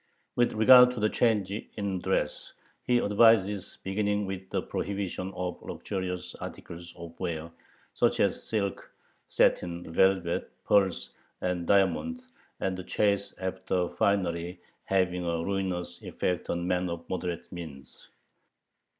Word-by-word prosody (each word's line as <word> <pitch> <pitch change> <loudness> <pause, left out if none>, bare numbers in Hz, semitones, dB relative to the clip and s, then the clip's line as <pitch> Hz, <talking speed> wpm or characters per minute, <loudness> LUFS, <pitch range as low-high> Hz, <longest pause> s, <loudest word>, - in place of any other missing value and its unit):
With 120 0 +2
regard 125 +3 +8
to 125 - -5
the 105 0 +2
change 105 -5 +2
in 100 -2 -4
dress, - - -1 0.3
he 125 - +4
advises 105 -3 +3
beginning 105 +1 0
with 95 -1 -6
the - - -1
prohibition 95 -1 -3
of 90 -1 -4
luxurious 90 -2 -4
articles 85 0 -8
of 85 -1 -9
wear, 85 -2 -3 0.4
such - - +2
as - - +2
silk, 100 -3 -2 0.4
satin, 85 -1 +1
velvet, 95 -2 +2 0.2
pearls, 95 -11 +2 0.3
and 90 -2 -1
diamonds, 100 - +2 0.3
the 95 -1 -2
chase 100 +1 0
after 95 -1 -1
finery 90 -3 0 0.3
having 90 -2 +1
a 85 -1 -1
ruinous 95 -3 -2
effect 90 -1 -2
on 85 0 -1
men 90 0 0
of 85 0 -6
moderate 90 -2 -4
means. 80 -6 -10
95 Hz, 125 wpm, -29 LUFS, 85-100 Hz, 0.4 s, regard